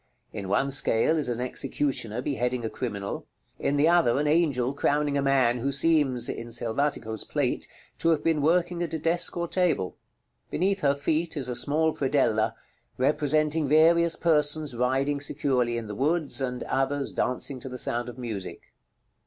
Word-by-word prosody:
In 100 Hz, -3 st, -5 dB
one 135 Hz, +7 st, +1 dB
scale 135 Hz, +2 st, +3 dB
is 150 Hz, -5 st, -1 dB
an 120 Hz, -1 st, -2 dB
executioner 125 Hz, -2 st, -2 dB
beheading 125 Hz, -3 st, -1 dB
a 110 Hz, -, -3 dB
criminal; 100 Hz, -5 st, -5 dB, 0.3 s
in 140 Hz, -, 0 dB
the 145 Hz, +2 st, +3 dB
other 165 Hz, -8 st, +3 dB
an 150 Hz, -, 0 dB
angel 145 Hz, -5 st, +1 dB
crowning 145 Hz, 0 st, 0 dB
a 140 Hz, -, +1 dB
man 130 Hz, -3 st, +2 dB
who 135 Hz, +4 st, -1 dB
seems 140 Hz, -4 st, +2 dB
(in 115 Hz, -, -5 dB
Selvatico's 115 Hz, -1 st, -2 dB
plate) -, -, -2 dB, 0.3 s
to 165 Hz, -, +1 dB
have 160 Hz, -3 st, +2 dB
been 160 Hz, -2 st, +1 dB
working 175 Hz, +3 st, +1 dB
at 165 Hz, -2 st, -2 dB
a -, -, 0 dB
desk 165 Hz, +3 st, 0 dB
or 170 Hz, 0 st, -1 dB
table. 170 Hz, -, 0 dB, 0.5 s
Beneath 195 Hz, +2 st, 0 dB
her 140 Hz, -1 st, +3 dB
feet 160 Hz, +3 st, -1 dB
is 130 Hz, -3 st, -4 dB
a 125 Hz, -, -3 dB
small 155 Hz, +5 st, +1 dB
predella, 115 Hz, -6 st, +1 dB, 0.4 s
representing 150 Hz, +2 st, +1 dB
various 165 Hz, +3 st, +4 dB
persons 150 Hz, -3 st, +2 dB
riding 135 Hz, +4 st, 0 dB
securely 130 Hz, -4 st, 0 dB
in 115 Hz, -, -4 dB
the 105 Hz, -, -6 dB
woods, 150 Hz, +4 st, 0 dB
and 125 Hz, -1 st, -3 dB
others 135 Hz, +1 st, -1 dB
dancing 130 Hz, +1 st, -2 dB
to 130 Hz, -, -6 dB
the 125 Hz, -, -6 dB
sound 120 Hz, 0 st, -3 dB
of 120 Hz, -, -10 dB
music. 110 Hz, -7 st, -7 dB
140 Hz, 170 wpm, -26 LUFS, 125-155 Hz, 0.5 s, various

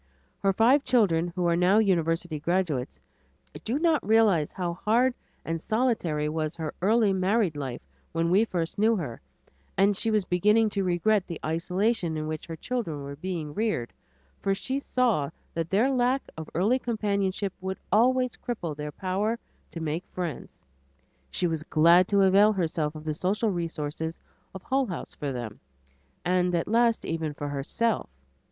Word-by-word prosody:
Her 195 Hz, -, +2 dB
five 245 Hz, +8 st, +4 dB
children, 180 Hz, -9 st, +3 dB
who 180 Hz, -1 st, 0 dB
are 170 Hz, 0 st, +3 dB
now 180 Hz, +4 st, +4 dB
university 170 Hz, -5 st, +1 dB
graduates, 160 Hz, -5 st, -1 dB, 0.6 s
do 235 Hz, +5 st, -1 dB
not 320 Hz, -1 st, +2 dB
realize 210 Hz, -8 st, +3 dB
how 175 Hz, -2 st, -3 dB
hard 235 Hz, +8 st, +2 dB, 0.3 s
and 165 Hz, 0 st, -2 dB
solitary 215 Hz, -11 st, 0 dB
was 155 Hz, +1 st, -2 dB
her 160 Hz, -2 st, -4 dB
early 210 Hz, +1 st, +3 dB
married 190 Hz, -2 st, +1 dB
life 135 Hz, -, -5 dB, 0.3 s
when 165 Hz, +1 st, 0 dB
we 200 Hz, +4 st, +5 dB
first 170 Hz, -3 st, -3 dB
knew 225 Hz, +2 st, +4 dB
her, 145 Hz, -, -5 dB, 0.6 s
and 200 Hz, +2 st, +4 dB
she 225 Hz, -, 0 dB
was 215 Hz, -3 st, +1 dB
beginning 210 Hz, +5 st, +3 dB
to 200 Hz, -, -1 dB
regret 185 Hz, +3 st, +1 dB
the 170 Hz, -, -6 dB
isolation 175 Hz, +2 st, 0 dB
in 155 Hz, -, -3 dB
which 155 Hz, -1 st, -5 dB
her 165 Hz, -, -5 dB
children 165 Hz, -, -3 dB
were 140 Hz, 0 st, -6 dB
being 160 Hz, -2 st, -4 dB
reared, 210 Hz, -, -1 dB, 0.5 s
for 195 Hz, 0 st, 0 dB
she 265 Hz, +7 st, -2 dB
saw 240 Hz, -, +1 dB, 0.2 s
that 165 Hz, 0 st, -2 dB
their 225 Hz, +8 st, +3 dB
lack 255 Hz, +1 st, +2 dB
of 160 Hz, -1 st, -7 dB
early 210 Hz, +10 st, +2 dB
companionship 200 Hz, -4 st, -1 dB
would 190 Hz, 0 st, -3 dB
always 250 Hz, +4 st, +3 dB
cripple 175 Hz, -13 st, -5 dB
their 150 Hz, 0 st, -5 dB
power 195 Hz, +7 st, -1 dB, 0.3 s
to 165 Hz, -, -6 dB
make 160 Hz, +2 st, -2 dB
friends. 175 Hz, -7 st, -6 dB, 0.6 s
She 180 Hz, -, -1 dB
was 165 Hz, -3 st, -1 dB
glad 170 Hz, +4 st, +5 dB
to 200 Hz, -1 st, +3 dB
avail 200 Hz, +3 st, +6 dB
herself 160 Hz, -4 st, -1 dB
of 155 Hz, -, -8 dB
the 155 Hz, -1 st, -2 dB
social 200 Hz, +7 st, 0 dB
resources 160 Hz, -2 st, -4 dB, 0.4 s
of 190 Hz, -, -8 dB
Hull 265 Hz, -1 st, +1 dB
House 180 Hz, -, -6 dB
for 145 Hz, -2 st, -4 dB
them, 120 Hz, -4 st, -6 dB, 0.7 s
and 180 Hz, 0 st, +2 dB
at 165 Hz, -, -1 dB
last 230 Hz, +1 st, +2 dB
even 160 Hz, -2 st, -3 dB
for 145 Hz, 0 st, -4 dB
herself. 175 Hz, -, -1 dB
185 Hz, 165 wpm, -27 LUFS, 160-220 Hz, 0.7 s, avail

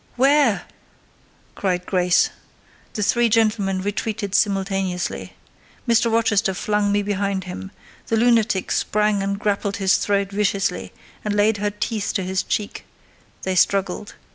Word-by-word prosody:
"'Ware!" 270 Hz, -4 st, +3 dB, 0.9 s
cried 180 Hz, -2 st, -1 dB
Grace. 180 Hz, -2 st, +2 dB, 0.6 s
The 210 Hz, -, -2 dB
three 235 Hz, +3 st, +3 dB
gentlemen 210 Hz, -4 st, +1 dB
retreated 205 Hz, 0 st, -3 dB
simultaneously. 195 Hz, -3 st, -1 dB, 0.5 s
Mr. 235 Hz, 0 st, +3 dB
Rochester 220 Hz, -3 st, +2 dB
flung 210 Hz, +1 st, 0 dB
me 205 Hz, 0 st, +1 dB
behind 200 Hz, -1 st, -1 dB
him: 185 Hz, +1 st, -7 dB, 0.4 s
the 225 Hz, -, +1 dB
lunatic 225 Hz, -4 st, +2 dB
sprang 210 Hz, -1 st, +1 dB
and 200 Hz, 0 st, -1 dB
grappled 200 Hz, 0 st, -1 dB
his 195 Hz, -1 st, +3 dB
throat 200 Hz, -1 st, 0 dB
viciously, 195 Hz, -, -1 dB, 0.3 s
and 210 Hz, -1 st, -1 dB
laid 205 Hz, +1 st, +3 dB
her 205 Hz, +1 st, 0 dB
teeth 210 Hz, 0 st, -3 dB
to 195 Hz, -, 0 dB
his 185 Hz, +1 st, -1 dB
cheek: 205 Hz, -1 st, -3 dB, 0.6 s
they 190 Hz, -, -1 dB
struggled. 195 Hz, +2 st, +1 dB
205 Hz, 130 wpm, -22 LUFS, 195-215 Hz, 0.9 s, Ware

